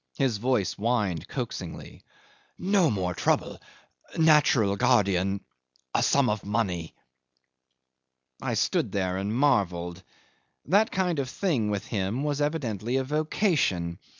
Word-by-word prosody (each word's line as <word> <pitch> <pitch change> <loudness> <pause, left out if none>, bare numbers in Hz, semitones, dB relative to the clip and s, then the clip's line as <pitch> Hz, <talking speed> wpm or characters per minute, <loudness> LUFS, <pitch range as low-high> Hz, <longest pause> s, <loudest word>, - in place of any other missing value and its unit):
His 130 -7 +1
voice 125 -4 +1
whined 105 -7 -1
coaxingly, - - -6 0.6
"No 185 -3 +2
more 95 -5 -1
trouble - - 0 0.6
natural 150 -10 +4
guardian 100 -1 +2 0.5
a - - +2
sum 140 -2 +3
of 105 -1 -1
money.. 100 -6 -2 0.7
." 65 0 -39
'I - - -2
stood - - 0
there 95 -2 -1
and 100 +2 -2
marvelled. 95 -9 +1 0.6
That 205 +7 +3
kind 180 -4 0
of 130 -2 -2
thing, 135 - 0
with 100 -1 -2
him, 105 +5 -2
was 145 -1 -1
evidently 125 - -1
a 135 - +1
vocation. 150 - 0
105 Hz, 125 wpm, -27 LUFS, 95-145 Hz, 0.7 s, natural